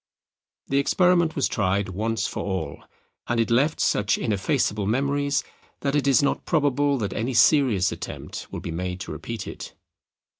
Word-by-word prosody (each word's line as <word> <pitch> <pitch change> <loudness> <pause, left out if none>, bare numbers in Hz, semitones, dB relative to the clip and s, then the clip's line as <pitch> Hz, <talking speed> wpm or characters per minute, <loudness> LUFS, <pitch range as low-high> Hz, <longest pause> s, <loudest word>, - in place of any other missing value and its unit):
The 135 - +1
experiment 175 +2 +3
was 140 - +1
tried 100 -2 0
once 110 +4 -1
for - - -3
all, 95 -5 -4 0.4
and 120 -1 0
it 115 0 +1
left 140 +7 +2
such 105 0 +2
ineffaceable 105 -1 0
memories 140 +4 +1 0.4
that 140 0 0
it 145 -1 +1
is 135 -1 +4
not 140 - 0
probable 145 -3 +1
that 105 -5 -3
any 120 +3 -2
serious 115 - +4
attempt - - -7
will - - -5
be 85 - -5
made 90 +2 -4
to - - -6
repeat 115 -3 -6
it. - - -8
120 Hz, 160 wpm, -24 LUFS, 100-140 Hz, 0.4 s, is